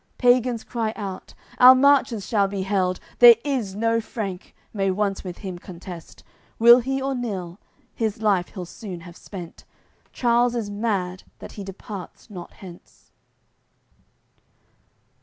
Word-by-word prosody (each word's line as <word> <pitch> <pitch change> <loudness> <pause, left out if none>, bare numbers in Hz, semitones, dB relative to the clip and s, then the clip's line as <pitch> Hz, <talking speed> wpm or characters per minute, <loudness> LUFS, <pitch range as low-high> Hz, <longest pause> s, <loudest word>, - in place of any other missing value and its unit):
Pagans 245 -2 +2
cry 225 -3 -3
out: 195 -3 -7 0.2
"Our 255 +1 +10
Marches 260 -6 +3
shall 205 -3 +1
be 195 -1 -4
held; 185 -2 0 0.2
There 240 -1 +10
is 245 -9 -2
no 230 +2 +1
Frank, 200 -5 -6 0.2
may 195 -2 0
once 195 0 -1
with 180 -2 -7
him 185 -4 -7
contest, 175 -1 -11 0.3
Will 235 +2 +8
he 270 +2 -2
or 270 +1 -2
nill, 200 -8 -5 0.3
his 220 -3 -2
life 200 -5 +1
he'll 185 -2 -8
soon 180 -1 -9
have 170 0 -12
spent. 180 -4 -10 0.5
Charles 240 0 +2
is 215 -4 -3
mad, 200 -4 -2 0.2
that - - -10
he 205 - -8
departs 195 +2 -10
not 175 -3 -9
hence." 180 -3 -15
205 Hz, 140 wpm, -23 LUFS, 185-235 Hz, 0.5 s, Our